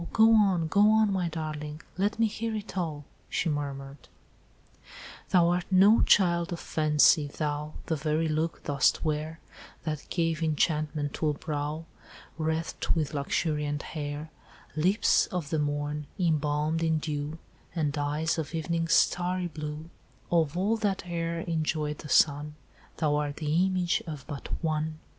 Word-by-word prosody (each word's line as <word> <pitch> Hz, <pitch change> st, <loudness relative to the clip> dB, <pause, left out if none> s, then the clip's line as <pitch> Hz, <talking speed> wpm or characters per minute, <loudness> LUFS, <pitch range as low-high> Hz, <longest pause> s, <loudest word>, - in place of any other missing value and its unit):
go 225 Hz, 0 st, +6 dB
on, 195 Hz, -6 st, +4 dB
go 205 Hz, +6 st, +5 dB
on, 220 Hz, -1 st, +4 dB
my 180 Hz, -3 st, 0 dB
darling! 155 Hz, -1 st, -5 dB, 0.2 s
let 200 Hz, +3 st, 0 dB
me 230 Hz, -, +3 dB
hear 220 Hz, +1 st, -2 dB
it 210 Hz, -2 st, -6 dB
all," 155 Hz, -6 st, -3 dB, 0.2 s
she -, -, -1 dB
murmured: 140 Hz, -2 st, -5 dB, 1.2 s
"'Thou 175 Hz, -2 st, +4 dB
art 175 Hz, 0 st, 0 dB
no 200 Hz, +4 st, +6 dB
child 170 Hz, -3 st, +3 dB
of 170 Hz, -, -3 dB
fancy—thou 150 Hz, -1 st, +2 dB
The 160 Hz, -, 0 dB
very 155 Hz, +2 st, 0 dB
look 160 Hz, +1 st, -1 dB
dost 140 Hz, +3 st, +2 dB
wear 155 Hz, +1 st, -2 dB, 0.4 s
That 155 Hz, -3 st, -4 dB
gave 165 Hz, -2 st, 0 dB
enchantment 150 Hz, -2 st, 0 dB
to 155 Hz, -, 0 dB
a 150 Hz, -, -1 dB
brow, 150 Hz, +1 st, -4 dB, 0.5 s
Wreathed 160 Hz, +1 st, -2 dB
with 155 Hz, -2 st, -1 dB
luxuriant 145 Hz, 0 st, -1 dB
hair— 150 Hz, 0 st, -5 dB, 0.4 s
Lips 185 Hz, +7 st, +3 dB
of 170 Hz, -5 st, -4 dB
the 160 Hz, -, +1 dB
morn, 145 Hz, 0 st, -2 dB
embalmed 155 Hz, -2 st, +1 dB
in 160 Hz, -1 st, +2 dB
dew, 150 Hz, 0 st, -3 dB, 0.4 s
And 150 Hz, -3 st, 0 dB
eyes 150 Hz, +3 st, 0 dB
of 160 Hz, +1 st, -4 dB
evening's 165 Hz, +1 st, 0 dB
starry 180 Hz, 0 st, +2 dB
blue, 150 Hz, +1 st, -6 dB, 0.4 s
Of 165 Hz, -2 st, +2 dB
all 205 Hz, +5 st, +1 dB
that 200 Hz, -4 st, -1 dB
e'er 170 Hz, -1 st, -2 dB
enjoyed 155 Hz, -3 st, -1 dB
the 150 Hz, -, -9 dB
sun, 150 Hz, +2 st, +3 dB, 0.4 s
Thou 150 Hz, -2 st, +1 dB
art 145 Hz, -1 st, -2 dB
the 160 Hz, +4 st, +2 dB
image 180 Hz, -2 st, 0 dB
of 150 Hz, -4 st, -6 dB
but 145 Hz, -, -7 dB, 0.2 s
one! 155 Hz, 0 st, -1 dB
155 Hz, 145 wpm, -28 LUFS, 150-170 Hz, 1.2 s, go